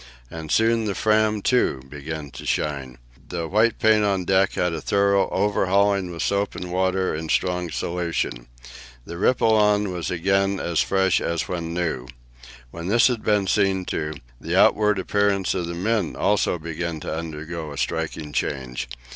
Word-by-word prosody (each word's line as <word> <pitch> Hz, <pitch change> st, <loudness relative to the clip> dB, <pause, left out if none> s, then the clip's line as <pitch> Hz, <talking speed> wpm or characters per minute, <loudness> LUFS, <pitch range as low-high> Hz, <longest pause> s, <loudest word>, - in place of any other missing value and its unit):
And 80 Hz, -1 st, -7 dB
soon 115 Hz, 0 st, +3 dB
the 100 Hz, -2 st, -2 dB
Fram, 110 Hz, -1 st, +2 dB
too, 120 Hz, -, +1 dB
began 75 Hz, +1 st, -7 dB
to 65 Hz, -, -9 dB
shine. 70 Hz, -5 st, -2 dB, 0.3 s
The 85 Hz, -2 st, -3 dB
white 110 Hz, +5 st, +2 dB
paint 110 Hz, -1 st, +4 dB
on 95 Hz, -3 st, 0 dB
deck 95 Hz, +1 st, +3 dB
had 90 Hz, -1 st, 0 dB
a 80 Hz, -, -4 dB
thorough 100 Hz, -1 st, +2 dB
overhauling 100 Hz, -1 st, +1 dB
with 85 Hz, -1 st, -4 dB
soap 100 Hz, 0 st, 0 dB
and 90 Hz, -1 st, -6 dB
water 95 Hz, +1 st, +1 dB
in 80 Hz, +1 st, -5 dB
strong 90 Hz, 0 st, 0 dB
solution. 85 Hz, -8 st, -3 dB, 0.6 s
The 85 Hz, -, -7 dB
Ripolin 105 Hz, -3 st, +3 dB
was 85 Hz, -2 st, -3 dB
again 95 Hz, +2 st, +1 dB
as 85 Hz, -2 st, -1 dB
fresh 95 Hz, -1 st, +2 dB
as 85 Hz, -1 st, -2 dB
when 85 Hz, -2 st, -4 dB
new. 80 Hz, -8 st, -2 dB, 0.6 s
When 85 Hz, +1 st, -7 dB
this 115 Hz, +6 st, +5 dB
had 120 Hz, -3 st, -2 dB
been 105 Hz, -2 st, +2 dB
seen 95 Hz, -1 st, +1 dB
to, 75 Hz, 0 st, -3 dB, 0.2 s
the -, -, -3 dB
outward 105 Hz, -1 st, +4 dB
appearance 100 Hz, 0 st, +1 dB
of 90 Hz, -3 st, -2 dB
the 85 Hz, -, -4 dB
men 105 Hz, 0 st, -1 dB
also -, -, +1 dB
began 85 Hz, 0 st, -4 dB
to -, -, -4 dB
undergo 80 Hz, 0 st, -6 dB
a 70 Hz, -, -8 dB
striking 80 Hz, -1 st, -3 dB
change. 65 Hz, -3 st, -3 dB
90 Hz, 165 wpm, -23 LUFS, 80-100 Hz, 0.6 s, this